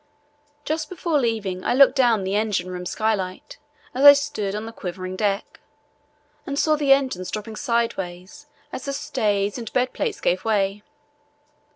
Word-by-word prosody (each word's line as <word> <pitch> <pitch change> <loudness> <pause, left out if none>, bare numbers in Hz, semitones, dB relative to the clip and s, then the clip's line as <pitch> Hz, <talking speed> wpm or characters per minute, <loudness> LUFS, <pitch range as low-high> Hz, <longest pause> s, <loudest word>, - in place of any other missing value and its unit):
Just 315 0 -2
before 335 -4 0
leaving, 210 -7 -2
I - - +1
looked 275 0 +6
down 240 -6 +3
the 190 +1 -2
engine 205 -4 -1
room 180 0 -5
skylight 195 -4 -3 0.3
as 265 - -1
I 285 0 +12
stood 275 -9 -2
on 215 +1 -4
the 225 - -7
quivering 185 -1 -6
deck, 200 0 -2 0.8
and 280 - -5
saw 310 +1 +3
the 290 -2 +1
engines 260 -10 +2
dropping 215 +1 -5
sideways 230 0 -3 0.3
as - - -6
the 280 - -3
stays 210 -6 -1
and 230 -2 -7
bed 250 0 +1
plates 455 -4 -2
gave 180 +1 0
way. 205 -2 0
220 Hz, 160 wpm, -23 LUFS, 195-275 Hz, 0.8 s, I